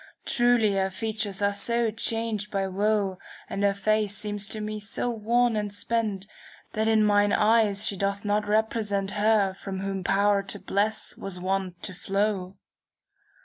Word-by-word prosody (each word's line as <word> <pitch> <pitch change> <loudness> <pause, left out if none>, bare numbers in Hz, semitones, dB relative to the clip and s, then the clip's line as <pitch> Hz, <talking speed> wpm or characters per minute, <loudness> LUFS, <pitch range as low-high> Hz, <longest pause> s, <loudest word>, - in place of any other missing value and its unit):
Truly 240 -4 +3
her 190 0 +1
features 205 0 -3
are 200 0 +2
so 235 +2 0
changed 225 -1 -2
by 195 -1 -1
woe, 195 0 0
■* - - -22 0.2
And 200 - -4
her 200 -1 +3
face 210 0 0
seems 205 -1 -2
to 215 - -4
me 215 0 -4
so 225 +3 -2
worn 235 +1 +2
and 210 -1 -2
spent. 205 -2 -2 0.5
That 220 +1 0
in 220 -1 +4
mine 205 0 +4
eyes 215 -2 +3
she 200 - 0
doth 200 +2 -2
not 210 0 +1
represent 210 -2 0
Her 210 -2 +2
from 190 0 -6
whom 195 -1 -3
power 200 +2 +3
to 195 +1 -3
bless 215 +3 -1
was 190 -2 -6
wont 185 -1 -2
to 185 - -4
flow." 195 0 -1
205 Hz, 165 wpm, -26 LUFS, 195-215 Hz, 0.5 s, in